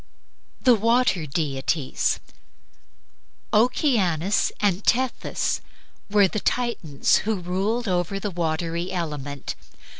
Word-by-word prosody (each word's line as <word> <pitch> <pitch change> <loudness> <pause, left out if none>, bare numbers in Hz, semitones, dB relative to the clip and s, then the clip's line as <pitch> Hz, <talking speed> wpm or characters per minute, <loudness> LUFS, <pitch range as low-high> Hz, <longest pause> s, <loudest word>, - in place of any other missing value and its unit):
THE 250 - +5
WATER 230 -6 +2
DEITIES 140 -1 -1 1.3
Oceanus 210 - +2
and 200 -1 +1
Tethys 255 +1 0 0.5
were 205 -1 +5
the 210 - -3
Titans 220 - +1
who 220 +1 -1
ruled 195 +6 -1
over 180 +1 0
the 205 0 -3
watery 170 +1 -2
element. 145 -6 -4
185 Hz, 90 wpm, -24 LUFS, 165-220 Hz, 1.3 s, THE